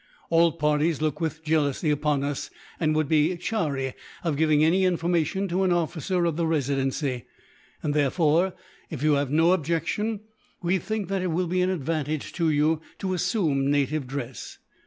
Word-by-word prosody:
All 165 -1 +4
parties 150 0 +1
look 155 +1 -1
with 160 0 -3
jealousy 155 -1 +1
upon 150 -1 +1
us, 140 -1 -3 0.3
and 155 -2 +1
would 155 -1 +1
be 160 +3 +2
chary 150 - -2 0.3
of 165 -4 0
giving 155 0 +3
any 180 +4 +3
information 175 +1 +1
to 180 +3 0
an 190 -1 +2
officer 175 +1 0
of 165 -2 0
the 170 -1 +1
Residency; 135 -4 -1 0.6
and 145 - 0
therefore, 155 +5 +2 0.4
if 150 -3 -5
you 155 -1 +4
have 140 -1 +1
no 165 +4 +4
objection, 175 +6 -1 0.4
we 180 +2 +2
think 215 0 -3
that 195 -1 0
it 185 - -1
will 175 +3 0
be 180 +2 0
an 180 - +2
advantage 155 -3 -2
to 165 -2 +1
you 155 +1 +2 0.2
to 185 -1 -2
assume 155 - +1
native 145 0 0
dress. 130 -2 -6
160 Hz, 170 wpm, -26 LUFS, 145-175 Hz, 0.6 s, All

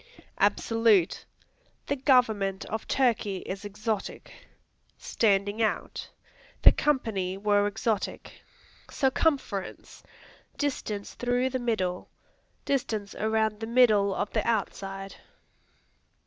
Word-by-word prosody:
Absolute; 225 -6 +2 0.6
"The 285 - -1
government 225 -8 +2
of 220 0 -5
Turkey 220 -7 +1
is 195 +2 -5
exotic." 210 +1 -4 0.6
Standing 205 0 +1
out; 220 - -2 0.5
"The - - +10
company 215 -10 -1
were 205 0 +2
exotic." 210 0 -3 0.5
Circumference 265 -7 -1 0.6
Distance 220 -8 -3
through 245 +1 0
the 260 - -1
middle. 190 -7 -2 0.6
Distance 220 -7 -2
around 220 -1 0
the 225 - -5
middle 215 -5 +4
of 205 - -2
the 215 - 0
outside. 195 -3 -3
215 Hz, 90 wpm, -27 LUFS, 200-245 Hz, 0.6 s, The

